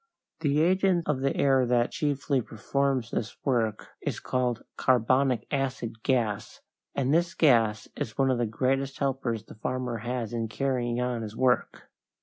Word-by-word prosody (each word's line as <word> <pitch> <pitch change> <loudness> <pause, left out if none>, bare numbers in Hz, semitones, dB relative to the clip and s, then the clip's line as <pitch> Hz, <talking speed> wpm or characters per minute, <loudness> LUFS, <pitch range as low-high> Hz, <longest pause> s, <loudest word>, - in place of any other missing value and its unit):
The 150 -1 +2
agent 185 0 +2
of 150 -3 +1
the 135 +1 0
air 135 -2 +4
that 120 -1 +2
chiefly 140 -2 0
performs 130 +2 -1
this 110 - -3
work 115 -6 0
is - - -3
called 125 -2 -1
carbonic 130 +1 +2
acid 130 -5 -2
gas, 110 -5 -1 0.4
and 135 +1 +1
this 170 +1 +2
gas 115 -8 +3
is 110 - -5
one 135 -1 +3
of 125 - 0
the 120 - +1
greatest 135 +4 0
helpers 130 -5 -1
the - - -13
farmer 125 +1 -3
has 120 0 -3
in 115 -1 -1
carrying 120 0 -1
on 125 -2 -1
his 110 -1 -6
work. 130 -1 0
130 Hz, 155 wpm, -28 LUFS, 115-135 Hz, 0.4 s, air